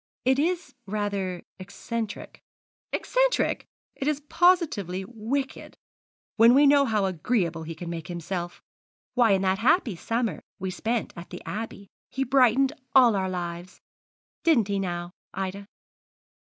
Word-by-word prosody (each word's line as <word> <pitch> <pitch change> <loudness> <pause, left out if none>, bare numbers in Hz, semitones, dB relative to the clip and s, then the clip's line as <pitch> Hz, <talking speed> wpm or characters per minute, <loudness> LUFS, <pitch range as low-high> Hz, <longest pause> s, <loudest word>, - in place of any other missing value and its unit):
'It 260 +1 +3
is 350 +3 -1
rather 200 -3 -2 0.2
eccentric.' 205 +3 -6 0.5
'Eccentric! - - +1 0.3
It 275 - -3
is 300 -2 +1
positively 260 - +2
wicked, 245 +5 -4 0.6
when 230 +2 +7
we 285 +2 +6
know 280 0 +6
how 215 -5 +1
agreeable 180 -2 0
he 165 +1 -6
can 170 +2 -7
make 170 -1 -5
himself. 175 0 -5 0.5
Why, 235 -5 +4
in 190 0 +1
that 190 0 +1
happy 250 - +3
summer 230 0 -2 0.2
we 190 0 -3
spent 225 +5 -2
at 170 0 -9
the 180 - -8
Abbey 210 -2 -6 0.2
he 270 - -1
brightened 265 +1 +4 0.2
all 245 -5 +7
our 190 -1 0
lives. 175 0 -5 0.6
Didn't 245 - +3
he, 200 -1 0
now, 175 -2 -3 0.2
Ida?' 195 +1 -4
205 Hz, 135 wpm, -26 LUFS, 185-260 Hz, 0.6 s, when